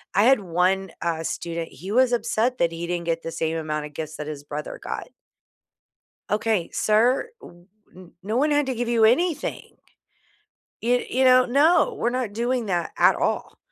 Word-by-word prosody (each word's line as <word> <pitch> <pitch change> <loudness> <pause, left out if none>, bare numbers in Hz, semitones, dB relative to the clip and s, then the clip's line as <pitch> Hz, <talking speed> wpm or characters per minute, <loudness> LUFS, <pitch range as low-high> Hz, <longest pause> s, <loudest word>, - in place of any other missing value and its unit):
I 200 - +5
had 265 +1 +5
one, 185 +1 0
uh, 165 -1 -2
student, 170 0 -4
he 190 +4 -9
was 250 +2 +3
upset 240 +1 0
that 170 -1 +2
he 170 +1 -5
didn't 175 -1 -3
get 165 0 -1
the 165 - -5
same 160 0 -2
amount 155 -1 -3
of 150 - -18
gifts 155 0 -6
that 150 - -6
his 145 -2 -6
brother 150 +1 -6
got. - - -5 1.2
"Okay, 210 -4 0
Sir 240 - +2
w 175 0 -15 0.3
n 180 -1 -14
no 215 +4 -2
one 295 +4 +2
had 290 -1 +2
to 260 - -2
give 235 0 -3
you 230 -2 +3
anything! 300 +7 0 1.1
Yo 245 +2 +2
you 260 +2 +1
know? 255 0 +6
No! 315 - +3
We're 235 - 0
not 245 -4 -3
doing 240 +1 -1
that 175 -3 -1
at - - +5
all." - - -2
210 Hz, 185 wpm, -24 LUFS, 170-250 Hz, 1.2 s, know